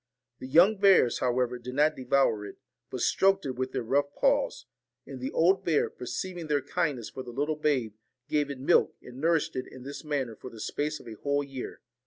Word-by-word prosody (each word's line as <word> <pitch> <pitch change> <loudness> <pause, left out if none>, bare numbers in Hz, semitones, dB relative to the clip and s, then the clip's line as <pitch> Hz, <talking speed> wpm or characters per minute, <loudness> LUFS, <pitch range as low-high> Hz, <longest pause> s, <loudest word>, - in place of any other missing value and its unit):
The 130 - -7
young 175 +10 +5
bears, 195 -11 +5
how 125 0 +1
ever, 125 0 -1
did 125 +1 -7
not 150 +2 +3
devour 125 -4 +1
it, 100 - -9 0.3
but - - -5
stroked 195 -1 +3
it 135 - -1
with 130 0 -3
their - - -2
rough 140 +4 0
paws; - - +1 0.4
and 135 -2 -8
the 130 - -2
old 185 +4 +3
bear, 160 -4 +1
perceiving 175 +6 -5
their 145 -2 +1
kindness 135 -8 -2
for 130 - -6
the 125 - -9
little 145 +6 -1
babe, 140 -8 0 0.3
gave 145 -1 0
it 140 - -5
milk, 140 +6 +3
and 125 +2 -10
nourished 165 0 +1
it 130 - -3
in 130 - -12
this 140 +1 -7
manner 140 -7 -2
for 130 - -10
the 115 - -12
space 150 +7 -2
of - - -14
a 115 - -7
whole 145 0 +1
year. 135 -2 -7
140 Hz, 215 wpm, -28 LUFS, 125-155 Hz, 0.4 s, young